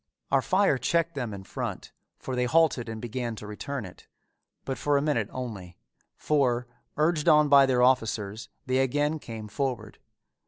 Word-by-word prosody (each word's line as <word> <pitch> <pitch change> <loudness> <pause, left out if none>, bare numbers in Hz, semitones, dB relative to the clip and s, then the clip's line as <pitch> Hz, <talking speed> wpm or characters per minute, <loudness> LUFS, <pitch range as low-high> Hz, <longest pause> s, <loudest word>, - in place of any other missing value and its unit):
Our 135 - +4
fire 185 -4 +2
checked 170 +5 +1
them 125 -7 -3
in 100 -1 -7
front, - - -5 0.3
for 130 - -5
they 125 0 +1
halted 135 -4 +2
and 110 0 -5
began 120 0 -4
to 105 - -9
return 110 +4 -5
it, 90 - -13 0.6
but 135 - -4
for 145 -1 +2
a - - +1
minute 120 -9 0
only, 105 -9 -7 0.4
for, 125 -5 +1 0.3
urged 155 +1 +2
on 150 -1 +5
by 140 -1 +7
their 125 -2 +3
officers 115 -4 +1 0.2
they 130 0 +1
again 145 +4 +1
came 110 -5 -8
forward. 130 +3 -4
130 Hz, 165 wpm, -27 LUFS, 115-145 Hz, 0.6 s, by